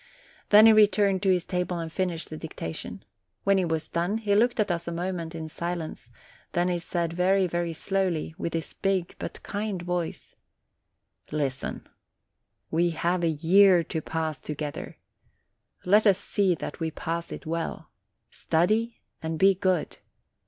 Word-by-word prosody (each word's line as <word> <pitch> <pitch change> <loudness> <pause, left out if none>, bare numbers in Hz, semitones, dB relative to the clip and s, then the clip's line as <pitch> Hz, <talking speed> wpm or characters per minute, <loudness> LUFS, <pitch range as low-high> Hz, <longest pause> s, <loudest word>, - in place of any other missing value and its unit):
Then 210 +1 +9
he 225 - +9
returned 205 -2 +4
to 195 - +2
his 180 -2 +2
table 180 -1 -2
and 165 -1 -5
finished 175 -4 -2
the - - -4
dicta 155 - -6
tion. - - -8 0.4
When 195 -1 +4
he 185 - +1
was 160 -1 -2
done, 175 +5 -1
he 210 -2 0
looked 235 +4 +3
at 210 -3 +2
us 170 0 -3
a - - -2
moment 170 -1 -3
in 160 -1 -5
silence; 170 -5 -5 0.4
then 175 +1 +2
he 175 -1 0
said, 170 -1 -2
very, 185 +2 +3
very 175 -1 -1
slowly, 180 -2 -1
with 165 - -3
his 160 -3 -4
big 190 -3 -1
but - - -7
kind 205 -2 -3
voice: 175 -2 -4 1.0
"Listen. 140 -3 -3 0.8
We 170 +2 +2
have 175 +1 0
a 165 - +3
year 175 +3 +5
to 160 0 -4
pass 160 -3 -3
together; 150 -1 -5 0.9
let 210 +4 +5
us 195 -2 +5
see 195 -3 +1
that 150 - -6
we 165 -1 -1
pass 165 +1 -4
it - - -7
well. 165 +1 -4 0.4
Study 215 +8 0 0.2
and 160 0 -3
be 195 +4 +6
good. 185 -3 -1
175 Hz, 160 wpm, -27 LUFS, 160-195 Hz, 1.0 s, Then